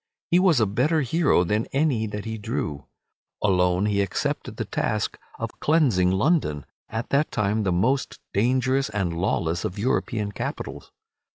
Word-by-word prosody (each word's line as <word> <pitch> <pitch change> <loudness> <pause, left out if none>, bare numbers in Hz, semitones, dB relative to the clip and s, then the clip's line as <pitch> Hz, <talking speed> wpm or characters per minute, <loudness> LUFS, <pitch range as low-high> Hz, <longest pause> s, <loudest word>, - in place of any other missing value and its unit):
He 175 - +6
was 180 -8 +4
a 110 - +4
better 130 +11 +1
hero 145 - +3
than 105 +5 0
any 135 -6 +1
that 105 0 -5
he 110 0 -4
drew. 75 -9 -4 0.6
Alone 90 -1 +3
he 100 -1 +2
accepted 100 -2 -2
the - - -2
task - - -1 0.2
of - - -4
cleansing 130 - +3
London, 95 - +1 0.2
at 110 +2 -4
that 145 +3 +1
time 105 0 0
the 95 -3 0
most 125 +10 0
dangerous 130 +4 +2
and 95 -5 -2
lawless 85 -1 0
of 90 - -3
European 105 -2 -1
capitals. - - -6
105 Hz, 155 wpm, -25 LUFS, 95-135 Hz, 0.6 s, He